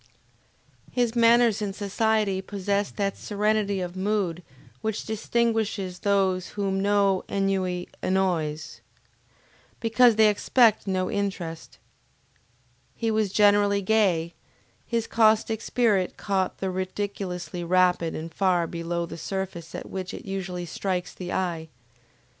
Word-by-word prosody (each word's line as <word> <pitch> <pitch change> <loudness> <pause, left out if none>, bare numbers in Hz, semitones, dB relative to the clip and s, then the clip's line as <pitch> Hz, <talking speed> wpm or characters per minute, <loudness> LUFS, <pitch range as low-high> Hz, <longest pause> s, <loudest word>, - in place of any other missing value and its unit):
His 245 -2 0
manners 235 -2 +4
in 200 -2 -2
society 205 -1 0
possessed 200 +1 -2
that 200 -1 0
serenity 210 -1 0
of 180 0 -5
mood 190 -3 -1 0.4
which 220 -1 -3
distinguishes 220 -4 -1
those 190 -2 +1
whom 195 -1 0
no 200 -1 +2
ennui 190 -2 -1
annoys, 170 -5 -1 1.0
because 230 +1 +4
they 220 0 +6
expect 215 +1 +3
no 185 -1 0
interest. 185 -5 -4 1.2
He 225 -1 -1
was 215 -3 +1
generally 205 -1 +4
gay, 185 -6 +2 0.5
his 230 -1 -1
caustic 220 0 +2
spirit 210 -8 +1
caught 190 -2 -1
the 190 -1 -2
ridiculous 185 -2 -4
rapidly 180 -1 +1
and 165 +1 -7
far 180 -3 +2
below 170 +1 -3
the 165 0 -9
surface 185 -2 -5
at - - -6
which 185 -1 -5
it - - -10
usually 185 -2 -4
strikes 180 0 -3
the 180 -1 -6
eye. 170 -3 -2
195 Hz, 120 wpm, -26 LUFS, 180-210 Hz, 1.2 s, they